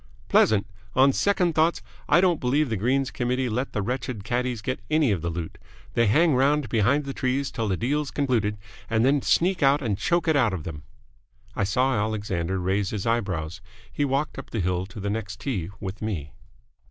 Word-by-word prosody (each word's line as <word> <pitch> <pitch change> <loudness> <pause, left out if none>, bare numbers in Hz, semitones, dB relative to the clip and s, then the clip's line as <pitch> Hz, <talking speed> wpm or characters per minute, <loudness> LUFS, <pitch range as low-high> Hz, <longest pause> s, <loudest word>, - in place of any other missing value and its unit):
"Pleasant! 105 -2 +4 0.3
On 135 +1 +5
second 185 -2 +2
thoughts 160 -4 +2 0.3
I 175 - +6
don't 180 -4 +3
believe 135 +2 +1
the - - +1
Greens 130 +6 0
Committee 125 +1 -1
let 125 +5 -2
the 105 - -1
wretched 125 -2 -3
caddies 120 0 -2
get 130 0 -2
any 155 -5 +3
of 95 -5 0
the 85 - -2
loot. 80 -1 -6 0.3
They 115 -1 +3
hang 155 +9 +4
round 140 0 +2
behind 135 +7 +1
trees 130 +1 -1
till 115 -3 -2
the 95 -2 0
deal's 145 +4 -1
concluded, 115 -7 0 0.3
and 115 +1 +2
then 140 +1 +3
sneak 180 +6 +2
out 140 +1 +4
and 105 -5 -1
choke 175 -1 +1
it 160 - +3
out 115 -8 +3
of 85 -5 -4
them!" 75 -2 -7 0.7
I 100 - +1
saw 130 +6 +1
Alexander 100 -5 -1
raise 95 +2 0
his 105 -3 -4
eyebrows. 95 -7 -1 0.3
He 145 - 0
walked 140 +1 -1
up 135 - -9
the 115 - -3
hill 90 0 -1
to 105 - -10
the 100 0 -2
next 105 -2 -4
tee 95 - -2
with 95 0 -6
me. 85 - -4
120 Hz, 195 wpm, -25 LUFS, 100-140 Hz, 0.7 s, I